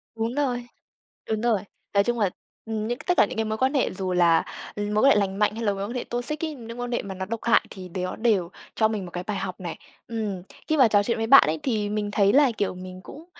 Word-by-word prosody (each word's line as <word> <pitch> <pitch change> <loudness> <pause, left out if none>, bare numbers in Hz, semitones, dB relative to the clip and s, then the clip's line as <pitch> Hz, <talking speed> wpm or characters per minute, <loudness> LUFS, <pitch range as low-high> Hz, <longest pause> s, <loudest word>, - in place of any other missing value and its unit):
Đúng 225 +2 -2
rồi, 245 -4 -1 0.6
đúng 220 -1 0
rồi. 230 -4 +2 0.3
Nói 200 0 +4
chung 240 +1 -1
là, 205 -4 +3 0.4
ừm, 220 -1 -3
những 240 - -2
cái - - -11
tất 360 - +2
cả - - +7
những - - -7
cái 220 - +1
mối 220 0 -2
quan 260 +4 +1
hệ 270 - +1
dù 185 -1 -3
là 170 -2 +4 0.3
mối 210 +2 0
quan 275 - +7
hệ - - +5
lành 195 -1 0
mạnh 210 0 +2
hay 230 - -4
là 205 -2 +2
mối 195 - -4
quan 235 - -6
hệ 250 - -2
toxic 245 +6 -4
ấy, 310 - -4
những 235 -1 -9
quan 245 0 -3
hệ 240 - 0
mà 195 -1 -7
nó 190 - -4
độc 230 +3 -4
hại 235 0 +4
thì 185 -2 -9
nó 185 +1 -3
đều 210 -7 +1 0.3
cho 220 - +4
mình 215 -4 -3
một 175 - -10
cái 180 +1 -4
bài 210 0 -3
học 185 -1 -4
này. 175 -3 -5 0.3
Ừm, 215 -5 -3 0.3
khi 310 - +1
mà 260 -5 +7
trò 205 -1 +3
chuyện 235 +2 0
với 225 - -1
bạn 275 +4 +9
ấy 155 0 0
thì 215 -5 0
mình 210 0 -2
thấy 200 -1 +3
là, 280 -3 +5
kiểu, 200 -2 -1
mình 185 0 -9
cũng 315 - -11
215 Hz, 280 wpm, -25 LUFS, 195-240 Hz, 0.6 s, bạn